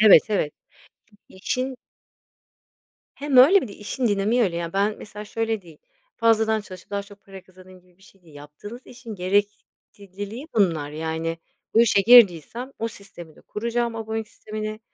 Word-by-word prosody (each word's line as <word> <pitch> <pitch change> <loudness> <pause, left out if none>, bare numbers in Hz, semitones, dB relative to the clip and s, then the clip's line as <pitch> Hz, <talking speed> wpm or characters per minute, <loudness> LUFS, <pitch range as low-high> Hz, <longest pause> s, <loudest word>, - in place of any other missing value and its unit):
evet, 210 -7 +8
evet, 195 -8 0 0.5
çünkü 215 - -25
işin 255 +7 -3 1.4
Hem 280 -1 -2
öyle 305 +11 +8
bir 255 - -5
de - - -10
işin 225 +5 -3
dinamiği 210 +4 +2
öyle 180 -6 0
ya, 170 -1 -4
ben 200 +2 +1
mesela 210 0 -9
şöyle 225 0 -2
değil, 165 -4 -16 0.4
fazladan 220 -1 +2
çalışıp 185 -3 -12
daha 200 0 -2
çok 200 0 -17
para 195 -1 -12
kazanayım 185 0 -17
gibi 180 0 -29
bir - - -24
şey 195 -1 -21
değil. 160 -4 -19
Yaptığınız 150 +11 -11
işin 240 -3 -10
gerekliliği 205 - -4
bunlar, 165 -9 +1
yani, 160 +1 -3 0.4
bu 225 - +6
işe 220 -4 +4
girdiysem 235 - +5
o 230 - -2
sistemi 175 -7 -13
de - - -17
kuracağım, 235 +1 -3
abonelik 220 -1 -4
sistemini 215 0 -6
205 Hz, 160 wpm, -23 LUFS, 185-225 Hz, 1.4 s, evet